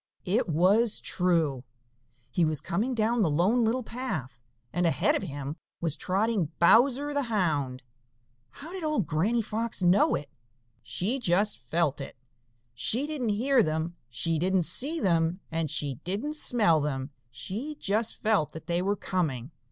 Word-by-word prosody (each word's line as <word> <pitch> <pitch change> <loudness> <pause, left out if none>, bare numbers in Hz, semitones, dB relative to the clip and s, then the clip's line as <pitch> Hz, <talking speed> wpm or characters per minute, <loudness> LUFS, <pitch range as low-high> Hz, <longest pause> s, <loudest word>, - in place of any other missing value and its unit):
It 200 +2 +1
was 200 +8 +3
true. 165 -8 0 0.7
He 175 - +1
was 155 -2 +1
coming 225 - -1
down 230 +1 +1
the 180 - +3
Lone 190 +11 +2
Little 240 +3 +1
Path, 160 - -5 0.3
and 175 -1 +2
ahead 165 - +2
of - - -1
him 145 -3 -5 0.2
was 165 -3 -1
trotting 190 -1 0
Bowser 260 +10 +4
the 285 -3 -1
Hound. 145 - 0 0.7
How 295 +4 -11
did 375 -2 -6
old 305 - 0
Granny 205 +11 +1
Fox 220 -1 -3
know 180 +3 +4
it? 145 - -5 0.5
She 230 +9 -2
just 205 -1 +2
felt 145 +3 -1
it! 135 - -8 0.6
She 225 - 0
didn't 295 -7 -2
hear 245 +5 +3
them, 160 +1 -1
she 155 +7 -1
didn't 185 +1 +2
see 295 - 0
them, 170 - +1
and 160 -1 -1
she 140 -4 -1
didn't 215 +12 -3
smell 210 - +3
them; 135 -1 -3 0.2
she 200 - -5
just 215 +3 -1
felt 210 -8 +2
that 160 - -9
they 175 0 0
were 200 +2 0
coming. 150 - -2
185 Hz, 155 wpm, -28 LUFS, 155-230 Hz, 0.7 s, Bowser